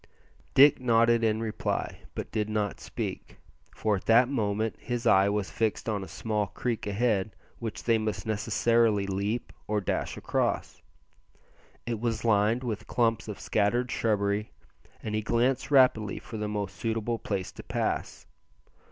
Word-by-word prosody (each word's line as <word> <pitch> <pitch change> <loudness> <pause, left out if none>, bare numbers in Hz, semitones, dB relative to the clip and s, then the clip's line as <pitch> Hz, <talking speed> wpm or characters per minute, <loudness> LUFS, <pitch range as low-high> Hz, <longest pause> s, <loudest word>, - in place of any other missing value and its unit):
Dick 140 +2 +7
nodded 115 -1 +3
in 110 0 +2
reply, 110 -2 -2 0.2
but - - -5
did 105 -1 -1
not 105 -3 -1
speak, - - -6 0.4
for 105 -2 +1
at - - -10
that 115 +2 +6
moment 110 -4 -1
his 120 -1 -4
eye 100 -3 +5
was 100 -1 -1
fixed 110 0 -1
on 105 -3 -1
a - - -8
small 105 -2 -2
creek 115 +2 -3
ahead 105 -1 0 0.2
which 115 -2 -5
they 115 -2 +3
must 110 -1 -3
necessarily 110 0 +2
leap 100 +4 -2
or 105 0 +1
dash 100 - -2
across. - - -1 1.0
It 115 -2 -2
was 115 -1 -2
lined 110 +3 +3
with 115 -4 -4
clumps 115 -2 +1
of - - -6
scattered 120 +4 +1
shrubbery, 105 -1 0 0.5
and 110 - -4
he 110 - 0
glanced 120 +5 +1
rapidly 125 -7 +4
for 110 - -8
the 105 0 -2
most 105 -2 -4
suitable 115 0 -1
place 95 -3 -3
to - - -10
pass. - - -3
110 Hz, 150 wpm, -28 LUFS, 105-115 Hz, 1.0 s, Dick